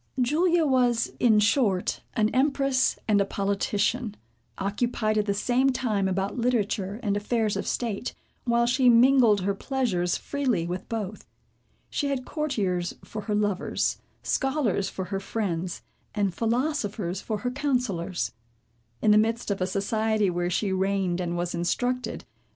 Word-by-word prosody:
Julia 325 Hz, +6 st, +3 dB
was, 250 Hz, -4 st, +2 dB
in 220 Hz, -4 st, +5 dB
short, 205 Hz, -3 st, +2 dB
an 215 Hz, -3 st, +3 dB
empress 275 Hz, 0 st, +2 dB
and 205 Hz, -2 st, +4 dB
a -, -, +4 dB
politician, 200 Hz, +3 st, -1 dB, 0.4 s
occupied 215 Hz, +2 st, 0 dB
at 210 Hz, -, -1 dB
the 200 Hz, -, +2 dB
same 250 Hz, +6 st, +2 dB
time 220 Hz, -7 st, 0 dB
about 195 Hz, +4 st, -1 dB
literature, 215 Hz, -4 st, 0 dB
and 205 Hz, -2 st, +1 dB
affairs 215 Hz, +1 st, 0 dB
of -, -, -3 dB
state, 235 Hz, -1 st, -2 dB, 0.3 s
while 235 Hz, -1 st, +2 dB
she 250 Hz, +1 st, +4 dB
mingled 235 Hz, -3 st, +6 dB
her 200 Hz, +2 st, 0 dB
pleasures 195 Hz, -7 st, -1 dB
freely 260 Hz, -12 st, -1 dB
with 180 Hz, +2 st, -5 dB
both. 215 Hz, -3 st, -4 dB, 0.6 s
She 290 Hz, -, -1 dB
had 270 Hz, -2 st, -2 dB
courtiers 200 Hz, -, -1 dB
for 215 Hz, -, -6 dB
her 210 Hz, 0 st, -2 dB
lovers, 205 Hz, -2 st, 0 dB, 0.2 s
scholars 265 Hz, -8 st, 0 dB
for 190 Hz, -, -5 dB
her 195 Hz, -, 0 dB
friends, 185 Hz, -4 st, -3 dB, 0.3 s
and 200 Hz, -3 st, +1 dB
philosophers 225 Hz, -, -1 dB
for 215 Hz, -, -3 dB
her 245 Hz, -, +1 dB
counsellors. 245 Hz, -, -1 dB, 0.7 s
In 215 Hz, -, +5 dB
the 210 Hz, -, +7 dB
midst 225 Hz, 0 st, 0 dB
of 195 Hz, -, -2 dB
a 185 Hz, -, +1 dB
society, 210 Hz, +1 st, +1 dB
where 175 Hz, 0 st, -1 dB
she 190 Hz, +2 st, 0 dB
reigned 190 Hz, -2 st, 0 dB
and 175 Hz, -1 st, -2 dB
was 175 Hz, 0 st, -2 dB
instructed. 245 Hz, +9 st, -1 dB
215 Hz, 145 wpm, -26 LUFS, 195-250 Hz, 0.7 s, the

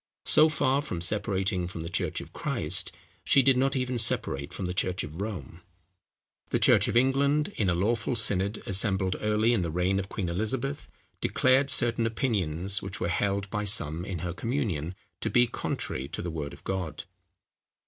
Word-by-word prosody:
So 155 Hz, +1 st, +5 dB
far 145 Hz, -2 st, +1 dB
from 90 Hz, -, -5 dB
separating 95 Hz, 0 st, +1 dB
from 85 Hz, -2 st, -7 dB
the 80 Hz, -, -5 dB
church -, -, -2 dB
of -, -, -12 dB
Christ, -, -, -1 dB, 0.3 s
she 135 Hz, -, +5 dB
did 135 Hz, 0 st, +5 dB
not 135 Hz, +2 st, +1 dB
even 125 Hz, -1 st, 0 dB
separate 70 Hz, -10 st, +2 dB
from 95 Hz, -, -5 dB
the 90 Hz, -, -2 dB
church 90 Hz, +1 st, -1 dB
of 80 Hz, +5 st, -7 dB
Rome. 100 Hz, -4 st, -6 dB, 0.9 s
The -, -, +1 dB
church -, -, +4 dB
of 115 Hz, -, +1 dB
England, 140 Hz, +4 st, +2 dB
in 100 Hz, -4 st, +1 dB
a 90 Hz, -, +1 dB
lawful 110 Hz, +6 st, 0 dB
synod, 100 Hz, -2 st, +2 dB
assembled 95 Hz, -1 st, +1 dB
early 105 Hz, +2 st, +2 dB
in 115 Hz, -, +1 dB
the 85 Hz, -, -2 dB
reign 90 Hz, +4 st, 0 dB
of 95 Hz, 0 st, -5 dB
Queen 95 Hz, -4 st, -3 dB
Elizabeth, 120 Hz, +10 st, -2 dB, 0.3 s
declared 130 Hz, +2 st, +3 dB
certain 120 Hz, -3 st, +2 dB
opinions, 100 Hz, -, -1 dB
which 95 Hz, 0 st, -6 dB
were 85 Hz, -, -1 dB
held 100 Hz, +3 st, 0 dB
by 105 Hz, -, -2 dB
some 85 Hz, -6 st, 0 dB
in 95 Hz, -3 st, -5 dB
her 85 Hz, -, -3 dB
communion, 95 Hz, -, -2 dB, 0.2 s
to -, -, -2 dB
be 120 Hz, 0 st, +4 dB
contrary 65 Hz, -, -4 dB
to -, -, -6 dB
the 85 Hz, -, -3 dB
word 75 Hz, -3 st, -5 dB
of -, -, -13 dB
God. 90 Hz, -6 st, -4 dB
100 Hz, 180 wpm, -28 LUFS, 90-120 Hz, 0.9 s, So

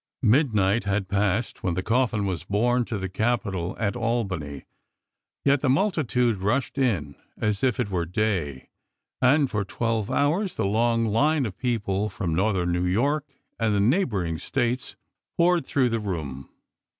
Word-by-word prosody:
Midnight 110 Hz, -5 st, +3 dB
had 100 Hz, -1 st, 0 dB
passed 100 Hz, +3 st, 0 dB
when 90 Hz, -3 st, -1 dB
the 95 Hz, -, -2 dB
coffin 115 Hz, -2 st, +1 dB
was 90 Hz, -4 st, -3 dB
borne 120 Hz, +4 st, +1 dB
to 110 Hz, -, -3 dB
the 95 Hz, -1 st, -3 dB
Capitol 100 Hz, -3 st, -1 dB
at 110 Hz, 0 st, -1 dB
Albany, 95 Hz, -, -2 dB, 0.8 s
yet 140 Hz, -1 st, +4 dB
the 145 Hz, -, +1 dB
multitude 130 Hz, -, +1 dB
rushed 120 Hz, +8 st, -1 dB
in 95 Hz, -, 0 dB, 0.2 s
as 105 Hz, 0 st, -1 dB
if 125 Hz, -4 st, +2 dB
it 100 Hz, -, -1 dB
were 85 Hz, -3 st, -1 dB
day, 90 Hz, -9 st, -2 dB, 0.5 s
and 140 Hz, +3 st, +4 dB
for 105 Hz, -2 st, 0 dB
twelve 115 Hz, +1 st, -2 dB
hours 175 Hz, +7 st, +1 dB
the -, -, -1 dB
long 115 Hz, +3 st, +2 dB
line 140 Hz, +7 st, +2 dB
of 100 Hz, -5 st, -5 dB
people 105 Hz, -5 st, -1 dB
from 95 Hz, -4 st, -3 dB
northern 90 Hz, -1 st, +1 dB
New 90 Hz, +1 st, 0 dB
York 140 Hz, +10 st, +1 dB, 0.3 s
and 110 Hz, -2 st, +1 dB
the -, -, +2 dB
neighboring 100 Hz, -, +1 dB
States 125 Hz, -1 st, -2 dB, 0.4 s
poured 175 Hz, -4 st, +3 dB
through 130 Hz, -3 st, +2 dB
the 115 Hz, 0 st, -1 dB
room. 75 Hz, -10 st, -5 dB
110 Hz, 155 wpm, -25 LUFS, 95-125 Hz, 0.8 s, yet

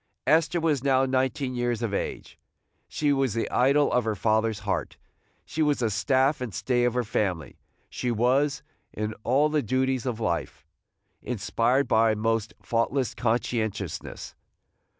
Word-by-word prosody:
Esther 160 Hz, +3 st, +3 dB
was 155 Hz, -5 st, 0 dB
now 135 Hz, -1 st, +3 dB
nineteen 130 Hz, 0 st, 0 dB
years 120 Hz, -1 st, -1 dB
of 110 Hz, -3 st, -2 dB
age; -, -, -4 dB, 0.5 s
she 145 Hz, -1 st, 0 dB
was 135 Hz, -5 st, 0 dB
the 115 Hz, -, -1 dB
idol 140 Hz, +3 st, +3 dB
of 125 Hz, -, +3 dB
her 110 Hz, -1 st, -1 dB
father's 110 Hz, +2 st, +1 dB
heart; 100 Hz, -2 st, -3 dB, 0.5 s
she 160 Hz, -, -3 dB
was 150 Hz, -2 st, +3 dB
the 115 Hz, -3 st, 0 dB
staff 130 Hz, +6 st, +2 dB
and 120 Hz, -5 st, -5 dB
stay 120 Hz, +2 st, +1 dB
of 120 Hz, 0 st, 0 dB
her 125 Hz, -, +1 dB
family; 95 Hz, -, -2 dB, 0.3 s
she 125 Hz, -, -3 dB
was, 130 Hz, +4 st, +1 dB, 0.3 s
in 110 Hz, +1 st, -3 dB
all 135 Hz, +5 st, +3 dB
the 150 Hz, -1 st, +1 dB
duties 130 Hz, +1 st, 0 dB
of 120 Hz, -3 st, -2 dB
life, 85 Hz, -6 st, -3 dB, 0.6 s
inspired 125 Hz, +4 st, 0 dB
by 110 Hz, 0 st, +4 dB
a -, -, -3 dB
most 110 Hz, 0 st, 0 dB
faultless 120 Hz, +3 st, 0 dB
conscientiousness. 110 Hz, -6 st, -2 dB
125 Hz, 150 wpm, -26 LUFS, 110-135 Hz, 0.6 s, by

